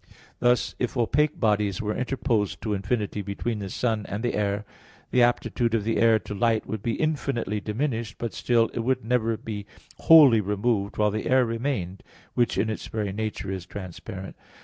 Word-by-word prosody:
Thus, 120 0 +2
if 125 +1 -2
opaque 145 +6 +1
bodies 105 -4 +1
were 105 0 -2
interposed 125 -5 -1
to 110 - -1
infinity 105 +1 -1
between 105 +3 -3
the 100 -1 -5
sun 110 -1 -1
and 105 +3 -4
the 120 - 0
air, 105 0 -1 0.5
the 125 - +4
aptitude 120 -1 +2
of 110 - 0
the 115 +1 0
air 115 -1 +5
to 105 - -7
light 115 +1 +1
would 110 -2 -4
be 115 +1 -1
infinitely 135 -9 -1
diminished, 115 0 -2
but 115 - -4
still 115 -2 +2
it - - -3
would 125 0 0
never 115 -2 +1
be 105 -2 -6 0.3
wholly 145 -9 +8
removed 105 0 -1
while 105 -1 +3
the 110 +1 -3
air 130 0 +4
remained, 115 -6 -3 0.3
which 120 -1 +1
in 110 - +2
its 110 - -4
very 105 -3 -3
nature 105 -2 -3
is 95 -2 -5
transparent. 95 0 -8
110 Hz, 180 wpm, -26 LUFS, 105-120 Hz, 0.5 s, wholly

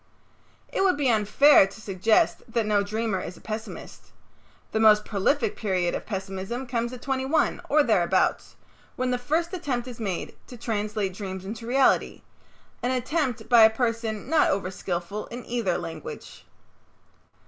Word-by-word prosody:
It - - +1
would 370 -5 +3
be 275 -4 +2
unfair 220 +2 +5
to 195 - -13
suggest 210 +1 +1
that 230 -2 0
no 210 -1 +2
dreamer 215 -1 -2
is 180 - -7
a - - -13
pessimist. 220 +1 -8 0.6
The 220 - 0
most 215 -1 +5
prolific 220 +4 0
period 185 -5 -1
of - - -5
pessimism 195 +5 -4
comes 235 -1 -2
at 255 - -9
twenty 265 -1 -1
one, 310 +4 +1
or 300 0 +5
thereabouts, 190 -6 +1 0.4
when 255 0 -1
the 250 - 0
first 320 +7 -1
attempt 270 -9 -3
is 245 -2 -9
made 195 -6 -4
to 245 - -10
translate 210 -3 -2
dreams 190 -1 -6
into 225 +3 -7
reality, 265 +2 +2 0.6
an 245 - 0
attempt 255 -2 -1
by 240 -2 +6
a 220 - +9
person 225 -2 -2
not 315 +2 +3
over 195 -1 -1
skillful 185 +3 -4
in 240 +1 -8
either 230 -7 -1
language. 160 -2 -8
225 Hz, 160 wpm, -26 LUFS, 200-250 Hz, 0.6 s, a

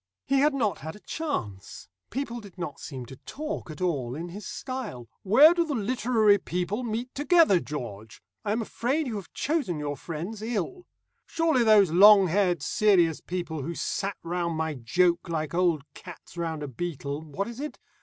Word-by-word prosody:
He 275 0 +2
had 295 +1 +3
not 215 - 0
had 160 +3 -7
a - - -13
chance. 105 - -5 0.2
People 240 -3 -3
did 200 -4 -13
not 170 -5 -5
seem 130 -3 -7
to 130 +2 -11
talk 305 - -6
at 155 +4 -9
all 135 -9 -1
in 170 +3 -5
his 195 +3 -8
style. 245 - -6
"Where 270 - +7
do 345 -1 +2
the 305 -4 -3
literary 220 -2 +3
people 180 +6 -2
meet 240 +1 -4
together, 295 - +4
George? 115 -9 -7 0.2
I - - -1
am 225 +2 0
afraid 270 +8 -1
you 230 -5 -3
have 175 -8 -9
chosen 285 - -1
your 145 -1 -3
friends 175 +9 -6
ill. 240 - -3 0.4
Surely 320 -7 +2
those 210 -6 +6
long 195 +1 +8
haired 180 -4 +1
serious 175 -6 +3
people 170 -4 -4
who 165 +5 -4
sat 195 +3 -2
round 170 -1 -2
my 160 -1 -1
joke 170 +8 +1
like 155 -2 -2
old 170 -4 +2
cats 180 0 -12
round 165 -3 -3
a - - -4
beetle 145 +1 -4
what 160 +6 -4
is 235 +1 -8
it? 300 +1 -5
185 Hz, 180 wpm, -27 LUFS, 160-235 Hz, 0.4 s, long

